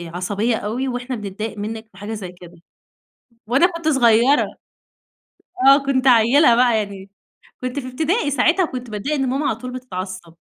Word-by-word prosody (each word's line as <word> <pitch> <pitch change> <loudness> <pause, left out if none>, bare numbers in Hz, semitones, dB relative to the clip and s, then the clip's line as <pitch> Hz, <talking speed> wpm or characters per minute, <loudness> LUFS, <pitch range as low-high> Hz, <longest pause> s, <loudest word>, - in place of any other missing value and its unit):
عصبية 205 +6 -1
أوي 235 +6 -3
وإحنا 250 0 -4
بنضايق 215 +1 -6
منِّك 220 +2 -6
في 185 - -20
حاجة 205 +2 -6
زي 190 -4 -6
كده 175 -1 -15 0.9
وأنا 270 +9 +4
كنت 335 -3 -4
صغيّرة، 245 0 +4 1.2
آه 275 +1 +8
كنت 265 -1 0
عيِّلة 240 +2 +5
بقى 240 -2 +3
يعني، 200 -2 -6 0.5
كنت 255 +2 -4
في 255 -2 -5
إبتدائي 315 - -1
ساعتها 325 +8 +2
كنت 250 -6 -6
باتضايق 215 +9 -3
إن 270 -2 -1
ماما 275 +3 -1
على 220 - 0
طول 250 +2 -7
بتتعصّب. 185 -8 -7
245 Hz, 160 wpm, -20 LUFS, 210-270 Hz, 1.2 s, آه